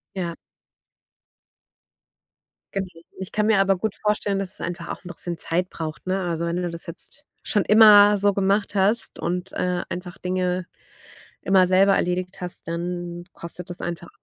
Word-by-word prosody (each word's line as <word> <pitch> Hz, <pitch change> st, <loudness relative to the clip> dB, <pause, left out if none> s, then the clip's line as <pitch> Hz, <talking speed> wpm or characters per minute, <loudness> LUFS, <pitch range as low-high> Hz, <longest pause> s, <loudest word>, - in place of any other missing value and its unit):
Ja. 175 Hz, -3 st, -3 dB, 2.4 s
Genau. 195 Hz, -1 st, -2 dB, 0.3 s
Ich 190 Hz, -1 st, -7 dB
kann 210 Hz, 0 st, +1 dB
mir 220 Hz, -3 st, +4 dB
aber 195 Hz, -1 st, +3 dB
gut 205 Hz, +3 st, -2 dB
vorstellen, 210 Hz, -1 st, 0 dB
dass 195 Hz, -1 st, -4 dB
es -, -, -13 dB
einfach 175 Hz, 0 st, -5 dB
auch -, -, -6 dB
'n -, -, -10 dB
bisschen 175 Hz, 0 st, -1 dB
Zeit 180 Hz, +3 st, -1 dB
braucht, 155 Hz, -3 st, -6 dB
ne? 190 Hz, +1 st, 0 dB
Also, 170 Hz, -2 st, -2 dB
wenn 170 Hz, +1 st, -1 dB
du 180 Hz, -1 st, -1 dB
das 170 Hz, 0 st, -8 dB
jetzt 190 Hz, -, -7 dB, 0.2 s
schon 205 Hz, -, +1 dB
immer 210 Hz, -1 st, +8 dB
so 200 Hz, 0 st, +2 dB
gemacht 200 Hz, +2 st, +1 dB
hast 205 Hz, +4 st, +2 dB
und, 180 Hz, +2 st, -3 dB
äh, 180 Hz, -1 st, -1 dB
einfach 180 Hz, +1 st, -6 dB
Dinge 180 Hz, 0 st, -1 dB, 0.8 s
immer 190 Hz, -1 st, +4 dB
selber 190 Hz, +2 st, +4 dB
erledigt 180 Hz, +1 st, -2 dB
hast, 180 Hz, -2 st, -4 dB
dann 175 Hz, 0 st, -4 dB
kostet 170 Hz, +1 st, -7 dB
das 175 Hz, -, -7 dB
einfach, 170 Hz, 0 st, -5 dB
180 Hz, 165 wpm, -23 LUFS, 175-195 Hz, 2.4 s, immer